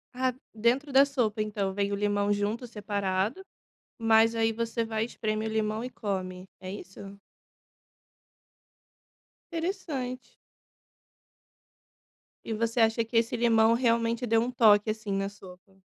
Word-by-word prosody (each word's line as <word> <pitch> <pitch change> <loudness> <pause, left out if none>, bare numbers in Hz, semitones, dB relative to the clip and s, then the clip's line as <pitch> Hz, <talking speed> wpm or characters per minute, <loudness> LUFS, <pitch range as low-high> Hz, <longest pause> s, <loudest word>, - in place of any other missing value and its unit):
Ah, 255 0 +1 0.2
dentro 250 +6 +1
da 275 +1 +7
sopa 235 -6 -1
então 205 -2 -2
vem 200 0 -1
o - - 0
limão 205 0 0
junto, 210 +4 -1
separado, 205 - -2 0.6
mas 225 0 +4
aí 225 0 +2
você 230 0 -2
vai 220 0 -1
espremer 215 -1 -3
o - - -5
limão 220 +1 -1
e - - -3
come, 185 -5 -4
é 185 - -8
isso? 195 0 -10 2.4
Interessante. 320 -8 -4 2.1
E 225 - -3
você 230 +2 0
acha 225 +1 +3
que 230 - -10
esse 235 +1 +1
limão 230 -1 +4
realmente 235 0 +1
deu 225 0 +3
um 245 - -2
toque 215 -3 +5
assim 215 -2 -3
na 195 0 -1
sopa? 190 -1 -16
220 Hz, 130 wpm, -28 LUFS, 205-235 Hz, 2.4 s, da